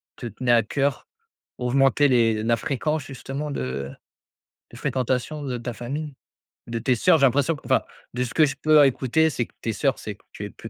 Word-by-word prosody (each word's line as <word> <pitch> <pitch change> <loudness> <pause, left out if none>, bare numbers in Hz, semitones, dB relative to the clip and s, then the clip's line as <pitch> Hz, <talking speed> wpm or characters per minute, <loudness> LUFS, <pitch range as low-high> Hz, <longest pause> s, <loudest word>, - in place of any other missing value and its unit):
te 120 - -7
tenait 120 +3 -1
à 115 -1 +6
cœur, 140 +5 -1 0.5
augmenter 135 +3 +3
les 115 -4 +3
la 115 0 +2
fréquence 150 +5 -2
justement 135 +2 -6
de 70 - -4 0.8
de 120 - -12
fréquentation 130 +3 -2
de 125 -3 -3
ta 120 0 -5
famille, 145 +5 -5 0.5
de 115 -1 -4
tes 125 +2 +1
sœurs? 165 +6 +4
J'ai 140 - +5
l'impression 145 +5 +1
enfin, - - +2 0.3
de 125 - 0
ce 120 - -5
que 155 - +5
je 135 - -3
peux 155 -1 +6
écouter, 135 +5 +2
c'est 125 -5 -2
que - - -26
tes 115 - -2
sœurs, 135 -2 0
c'est 105 - -6
que - - -29
tu 105 - -7
es - - -6
plus 115 - -11
130 Hz, 200 wpm, -24 LUFS, 115-145 Hz, 0.8 s, à